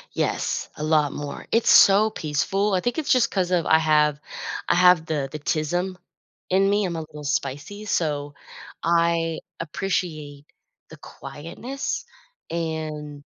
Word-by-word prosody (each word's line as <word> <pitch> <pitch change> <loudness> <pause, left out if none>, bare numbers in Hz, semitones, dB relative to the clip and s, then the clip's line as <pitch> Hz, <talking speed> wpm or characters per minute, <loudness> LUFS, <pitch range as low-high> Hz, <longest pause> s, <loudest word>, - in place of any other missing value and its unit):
Yes. - - -1
A 150 - -4
lot 155 -2 +2
more. 145 -1 -7
It's 230 - +3
so 205 +2 +7
peaceful. 195 +5 0
I 180 - +1
think 245 +6 -1
it's 300 - -1
just 250 -2 +4
'cause 185 -2 0
of 175 -3 +1
I 160 - +5
have 150 -2 +3 0.5
I - - +4
have 180 -2 +5
the 145 -4 -1
the 155 - -6
'tism 175 +5 -1 0.6
in 195 +1 +4
me. 205 0 +2
I'm 170 -2 -3
a - - -3
little 150 -1 -10
spicy, 145 +9 -3
so 145 -6 -1 0.5
I 170 -1 +2 0.2
appreciate 155 -4 -3 0.4
the - - -12
quietness 240 - -6 0.5
and 155 -3 -4
165 Hz, 145 wpm, -24 LUFS, 150-190 Hz, 0.6 s, so